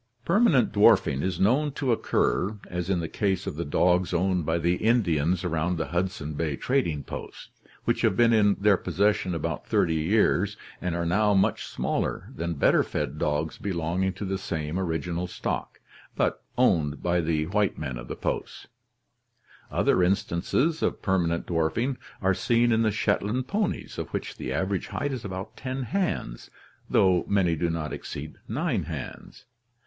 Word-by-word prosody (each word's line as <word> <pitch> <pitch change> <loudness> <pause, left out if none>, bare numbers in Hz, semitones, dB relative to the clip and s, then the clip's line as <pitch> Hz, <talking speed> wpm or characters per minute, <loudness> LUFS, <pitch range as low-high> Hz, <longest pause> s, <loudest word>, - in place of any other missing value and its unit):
Permanent 170 - +4
dwarfing 105 - +4
is 90 0 -2
known 135 +9 +3
to 135 -3 0
occur, 105 -2 +1
as 90 0 -4
in 90 -3 +1
the 80 - -3
case 95 +1 -1
of - - -4
the 85 - -2
dogs 90 +4 +2
owned 90 -2 +1
by 80 +1 +2
the 85 +2 +1
Indians 90 -7 +2
around 85 0 0
the 80 -3 -3
Hudson 90 -3 -2
Bay 75 -1 -1
trading 85 - 0
posts, - - -8 0.4
which - - +1
have - - +2
been 120 -1 +5
in 105 -2 +4
their 100 -1 +3
possession 100 -2 +1
about 80 - -3
thirty 80 - +2
years 100 +4 +2 0.2
and 90 -2 -1
are 85 0 -1
now 100 +4 +3
much 95 - +1
smaller - - -2
than 85 0 -3
better 70 - +4
fed - - -3
dogs 75 +1 -1
belonging 90 0 -1
to 100 +2 -6
the 95 0 -2
same 80 -1 -3
original 85 0 -2
stock, - - -4 0.4
but - - 0 0.2
owned 80 - +2
by 90 0 +2
the 80 -1 0
white 100 +3 0
men 65 -5 -4
of 65 - -9
the - - -5
posts. - - -4 1.0
Other - - +2
instances 100 - +1
of - - -1
permanent 85 -4 +1
dwarfing 90 - 0 0.2
are 95 0 +4
seen 120 +5 +2
in 110 0 +3
the 110 - +3
Shetland 110 +3 0
ponies, 205 +4 -2
of - - -3
which - - -5
the 65 - -4
average 95 +7 -1
height 145 0 -2
is 130 -4 -4
about 95 -1 -6
10 130 0 -4
hands, 125 - -2 0.4
though 90 -2 +4
many 95 -4 +2
do 85 +2 0
not 80 -2 -3
exceed 75 +2 -7
9 - - -1
hands. - - -8
90 Hz, 165 wpm, -26 LUFS, 85-105 Hz, 1.0 s, been